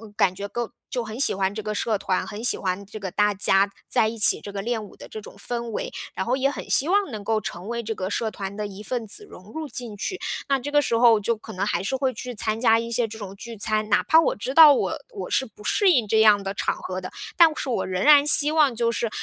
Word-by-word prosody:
感 185 Hz, -3 st, +2 dB
觉 200 Hz, +1 st, -5 dB
跟 240 Hz, +2 st, -4 dB, 0.2 s
就 245 Hz, -2 st, -2 dB
很 220 Hz, +2 st, -8 dB
喜 280 Hz, -, +2 dB
欢 190 Hz, 0 st, -1 dB
这 215 Hz, -, -5 dB
个 215 Hz, 0 st, -4 dB
社 215 Hz, 0 st, 0 dB
团， 185 Hz, -1 st, -1 dB
很 215 Hz, 0 st, -7 dB
喜 -, -, +1 dB
欢 190 Hz, +1 st, -3 dB
这 210 Hz, +2 st, -10 dB
个 190 Hz, -2 st, -5 dB
大 210 Hz, +2 st, +2 dB
家 195 Hz, 0 st, +3 dB, 0.2 s
在 220 Hz, -, +2 dB
一 225 Hz, +1 st, -5 dB
起 210 Hz, -, +4 dB
这 205 Hz, -, -9 dB
个 200 Hz, -, -3 dB
练 230 Hz, 0 st, -2 dB
武 205 Hz, -, -12 dB
的 -, -, -12 dB
这 220 Hz, -, -7 dB
种 210 Hz, -, -12 dB
氛 235 Hz, -1 st, -5 dB
围。 -, -, -4 dB, 0.2 s
然 190 Hz, -, -3 dB
后 255 Hz, +3 st, 0 dB
也 275 Hz, +1 st, +1 dB
很 285 Hz, -, -7 dB
希 285 Hz, -, +3 dB
望 395 Hz, -5 st, +1 dB
能 210 Hz, -2 st, -6 dB
够 220 Hz, 0 st, 0 dB
成 180 Hz, +3 st, -6 dB
为 235 Hz, 0 st, -3 dB
这 225 Hz, 0 st, -3 dB
个 190 Hz, -2 st, -4 dB
社 220 Hz, +1 st, -2 dB
团 195 Hz, 0 st, -6 dB
的 210 Hz, -, -4 dB
一 200 Hz, +1 st, -10 dB
份 235 Hz, +1 st, -4 dB
子 320 Hz, -, -8 dB
融 195 Hz, -, -14 dB
入 315 Hz, +2 st, -5 dB
进 235 Hz, -4 st, -7 dB
去。 370 Hz, -, -4 dB, 0.3 s
那 275 Hz, -, +2 dB
这 285 Hz, +3 st, -6 dB
个 290 Hz, 0 st, +4 dB
时 230 Hz, -4 st, 0 dB
候 230 Hz, -2 st, +5 dB
就 230 Hz, +3 st, 0 dB
可 220 Hz, -, -12 dB
能 185 Hz, +2 st, -2 dB
还 190 Hz, -3 st, -1 dB
是 200 Hz, -, -1 dB
会 260 Hz, -1 st, 0 dB
去 250 Hz, +2 st, -7 dB
参 215 Hz, 0 st, -2 dB
加 225 Hz, -2 st, +4 dB
一 230 Hz, -, -5 dB
些 235 Hz, 0 st, 0 dB
这 220 Hz, 0 st, -9 dB
种 200 Hz, -2 st, -8 dB
聚 230 Hz, +2 st, -9 dB
餐， 215 Hz, +1 st, -1 dB
哪 -, -, +4 dB
怕 320 Hz, -, +5 dB
我 -, -, +1 dB
知 255 Hz, +6 st, -5 dB
道 310 Hz, -2 st, +9 dB
我 -, -, -1 dB
我 425 Hz, -5 st, -7 dB
是 265 Hz, -, +1 dB
不 215 Hz, -3 st, -17 dB
适 385 Hz, -, +3 dB
应 245 Hz, -8 st, +2 dB
这 220 Hz, +2 st, +3 dB
样 210 Hz, -2 st, +6 dB
的 195 Hz, 0 st, -4 dB
场 -, -, -1 dB
合 185 Hz, 0 st, -5 dB
的， 185 Hz, -, -7 dB, 0.2 s
但 335 Hz, -2 st, +6 dB
是 270 Hz, -, -4 dB
我 240 Hz, -, -1 dB
仍 185 Hz, 0 st, -3 dB
然 290 Hz, -1 st, +6 dB
希 300 Hz, 0 st, +6 dB
望 295 Hz, -5 st, +4 dB
就 230 Hz, 0 st, 0 dB
是， 230 Hz, 0 st, -1 dB
220 Hz, 305 characters per minute, -24 LUFS, 205-250 Hz, 0.3 s, 道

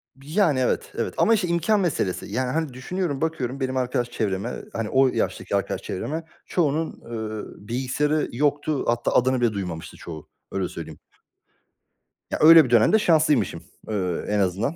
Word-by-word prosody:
B 135 Hz, +1 st, -18 dB
Yani, 170 Hz, -10 st, +3 dB
evet, 125 Hz, -, 0 dB
evet. -, -, -2 dB
Ama, 230 Hz, -, +4 dB
işte, 200 Hz, -5 st, +1 dB
imkân 170 Hz, +5 st, +2 dB
meselesi. 145 Hz, -, -1 dB
Yani, 125 Hz, +5 st, -2 dB
hani, 155 Hz, -4 st, -2 dB
düşünüyorum, 145 Hz, +2 st, -3 dB
bakıyorum 140 Hz, -5 st, -2 dB
benim 130 Hz, 0 st, -1 dB
arkadaş 125 Hz, -1 st, -1 dB
çevreme, 100 Hz, +1 st, -2 dB
ııı, -, -, -8 dB
hani, 115 Hz, -2 st, -3 dB
o 135 Hz, 0 st, +4 dB
yaştaki -, -, -1 dB
arkadaş -, -, -1 dB
çevreme. 155 Hz, -, -4 dB, 0.2 s
Çoğunun, 160 Hz, -1 st, 0 dB
eee, 110 Hz, -3 st, -7 dB
bilgisayarı 135 Hz, +5 st, 0 dB
yoktu. 145 Hz, +3 st, 0 dB
Hatta 120 Hz, 0 st, +1 dB
adını 130 Hz, 0 st, +3 dB
bile 115 Hz, -3 st, +2 dB
duymamıştı 90 Hz, -5 st, -5 dB
çoğu, 80 Hz, -3 st, -9 dB, 0.2 s
öyle -, -, -1 dB
söyleyeyim. -, -, -8 dB, 1.3 s
Ya, -, -, 0 dB
öyle 160 Hz, -1 st, +9 dB
bir -, -, -5 dB
dönemde 120 Hz, -, +5 dB
şanslıymışım, 155 Hz, -, +2 dB, 0.3 s
eee, 90 Hz, -5 st, -2 dB
en 105 Hz, -1 st, +1 dB
azından. 100 Hz, -, 0 dB
130 Hz, 165 wpm, -24 LUFS, 110-155 Hz, 1.3 s, öyle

